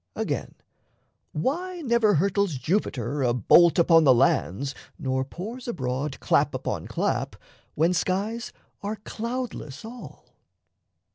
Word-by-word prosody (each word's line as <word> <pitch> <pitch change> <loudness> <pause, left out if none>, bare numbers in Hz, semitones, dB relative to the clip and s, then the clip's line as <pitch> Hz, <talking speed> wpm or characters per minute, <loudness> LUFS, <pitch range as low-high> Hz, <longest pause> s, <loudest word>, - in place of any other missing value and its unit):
Again, - - -3 0.8
why 345 - -2
never 235 - +3
hurtles 195 0 +1
Jupiter 140 - -1
A 120 -2 +2
bolt 170 - +5
upon 165 -1 +6
the 130 -4 +6
lands 135 - +1 0.2
nor 130 0 -1
pours 220 - -7
abroad 135 - -3
Clap - - +2
upon - - -3
clap, - - -1 0.4
when 165 +4 +3
skies 200 +6 -1 0.3
are 205 +1 -3
cloudless 220 - -5
all? 240 +2 -10
175 Hz, 115 wpm, -26 LUFS, 135-225 Hz, 0.8 s, upon